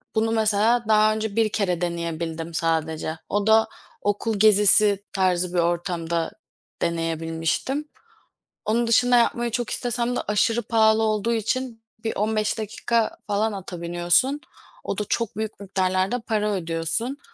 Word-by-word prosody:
bunu 225 Hz, +1 st, +1 dB
mesela 220 Hz, +2 st, +2 dB
daha 215 Hz, 0 st, +4 dB
önce 220 Hz, -1 st, -3 dB
bir 225 Hz, -1 st, +2 dB
kere 180 Hz, -5 st, -1 dB
deneyebildim 170 Hz, -1 st, -3 dB
sadece. 160 Hz, -1 st, -1 dB
O 205 Hz, +1 st, 0 dB
da 220 Hz, 0 st, +5 dB, 0.3 s
okul 205 Hz, +1 st, -1 dB
gezisi 210 Hz, -1 st, +5 dB
tarzı 180 Hz, -2 st, +1 dB
bir 175 Hz, -, +1 dB
ortamda 170 Hz, -1 st, -1 dB, 0.5 s
deneyebilmiştim. 165 Hz, -, -2 dB, 0.8 s
Onun 230 Hz, +2 st, +1 dB
dışında 245 Hz, +1 st, +4 dB
yapmayı 235 Hz, 0 st, +1 dB
çok 240 Hz, 0 st, -2 dB
istesem 245 Hz, 0 st, -1 dB
de -, -, -1 dB
aşırı 220 Hz, +3 st, +2 dB
pahalı 220 Hz, 0 st, +3 dB
olduğu 215 Hz, +1 st, 0 dB
için 230 Hz, +1 st, -2 dB, 0.2 s
bir 225 Hz, -, -2 dB
15 215 Hz, +1 st, 0 dB
dakika 220 Hz, +1 st, -1 dB
falan 210 Hz, +1 st, 0 dB
ata 180 Hz, -3 st, -7 dB
biniyorsun. 175 Hz, +12 st, +1 dB, 0.4 s
O -, -, -3 dB
da 210 Hz, -, -1 dB
çok 230 Hz, -3 st, -1 dB
büyük 220 Hz, -1 st, -4 dB
miktarlarda 190 Hz, +3 st, 0 dB
para 215 Hz, -2 st, -1 dB
ödüyorsun. 170 Hz, -, -2 dB
210 Hz, 135 wpm, -24 LUFS, 175-225 Hz, 0.8 s, da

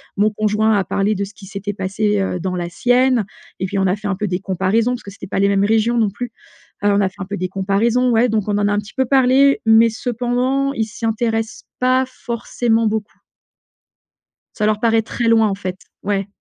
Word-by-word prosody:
Mon 210 Hz, +1 st, +3 dB
conjoint 215 Hz, +1 st, +1 dB
a 195 Hz, -, 0 dB
parlé 200 Hz, +2 st, 0 dB
de 200 Hz, 0 st, -2 dB
ce 205 Hz, -, -13 dB
qui 195 Hz, -, -13 dB
s'était 205 Hz, +1 st, -5 dB
passé, 200 Hz, +2 st, -1 dB
heu, 180 Hz, -1 st, -2 dB
dans 185 Hz, +1 st, -3 dB
la 175 Hz, -1 st, -3 dB
sienne, 245 Hz, +3 st, +2 dB, 0.3 s
et 190 Hz, -, -1 dB
puis 190 Hz, -, -3 dB
on 190 Hz, -, +2 dB
a 185 Hz, +3 st, +1 dB
fait 210 Hz, -, -5 dB
un 200 Hz, -, 0 dB
peu 210 Hz, +2 st, -2 dB
des 180 Hz, -1 st, -2 dB
comparaisons, 195 Hz, +5 st, 0 dB
parce 245 Hz, -, -6 dB
que 200 Hz, -, -9 dB
c'était 200 Hz, -, -10 dB
pas 190 Hz, -, -2 dB
les 200 Hz, 0 st, +3 dB
mêmes 200 Hz, 0 st, +2 dB
régions 225 Hz, +2 st, +2 dB
non 220 Hz, -3 st, +3 dB
plus. 240 Hz, +4 st, -6 dB, 0.5 s
Heu, -, -, +5 dB
on 200 Hz, 0 st, +3 dB
a 190 Hz, -, +1 dB
fait 190 Hz, -, -25 dB
un -, -, -3 dB
peu 205 Hz, +2 st, -5 dB
des 185 Hz, 0 st, -3 dB
comparaisons, 210 Hz, +6 st, +1 dB
ouais, 235 Hz, +2 st, +3 dB
donc 215 Hz, -2 st, -1 dB
on 205 Hz, -, 0 dB
en 205 Hz, 0 st, +1 dB
a -, -, 0 dB
un -, -, +1 dB
petit 210 Hz, +2 st, -10 dB
peu 265 Hz, -, +1 dB
parlé, 270 Hz, +2 st, +4 dB
mais 225 Hz, +1 st, +6 dB
cependant, 250 Hz, +4 st, -1 dB
ils 225 Hz, -5 st, -1 dB
s'y 225 Hz, +1 st, -7 dB
intéressent 225 Hz, 0 st, -1 dB, 0.2 s
pas 255 Hz, +1 st, +3 dB
forcément 235 Hz, -2 st, -1 dB
beaucoup. 215 Hz, -1 st, -3 dB, 1.4 s
Ça 210 Hz, -, 0 dB
leur 215 Hz, 0 st, +1 dB
paraît 225 Hz, 0 st, +3 dB
très 235 Hz, +2 st, -3 dB
loin 225 Hz, -1 st, +4 dB
en 195 Hz, -, -1 dB
fait, 185 Hz, -2 st, -5 dB, 0.3 s
ouais. 200 Hz, -1 st, -1 dB
215 Hz, 235 wpm, -19 LUFS, 200-235 Hz, 1.4 s, mais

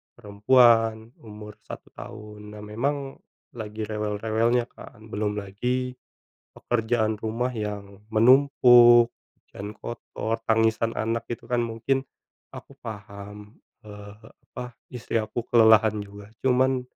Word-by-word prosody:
perempuan 115 Hz, +1 st, +3 dB
umur 105 Hz, -1 st, -12 dB
1 -, -, -10 dB
tahun. 105 Hz, -2 st, -10 dB
Nah, 105 Hz, -, -10 dB
memang 135 Hz, +6 st, -3 dB, 0.3 s
lagi 110 Hz, -1 st, -6 dB
rewel-rewelnya 110 Hz, +3 st, 0 dB
kan 110 Hz, +1 st, -14 dB
belum 105 Hz, 0 st, -2 dB
lagi 125 Hz, +6 st, -3 dB, 0.5 s
pekerjaan 110 Hz, -2 st, -1 dB
rumah 115 Hz, +4 st, -2 dB
yang 100 Hz, -1 st, -6 dB
menumpuk 120 Hz, -1 st, +6 dB, 0.5 s
dan 105 Hz, +1 st, -6 dB
kotor, 115 Hz, -1 st, -5 dB
tangisan 115 Hz, 0 st, +1 dB
anak 115 Hz, +1 st, -1 dB
itu 120 Hz, -, -7 dB
kan 120 Hz, -1 st, 0 dB
mungkin 115 Hz, +4 st, -1 dB, 0.5 s
aku -, -, -12 dB
paham, 105 Hz, 0 st, -10 dB, 0.3 s
eee, 105 Hz, +1 st, -12 dB, 0.2 s
apa, 125 Hz, -1 st, -8 dB, 0.2 s
istri 120 Hz, -2 st, -6 dB
aku 115 Hz, +2 st, -4 dB
kelelahan 110 Hz, -2 st, +5 dB
juga. 100 Hz, 0 st, -12 dB, 0.2 s
Cuman, 130 Hz, 0 st, +2 dB
110 Hz, 110 wpm, -25 LUFS, 105-120 Hz, 0.5 s, menumpuk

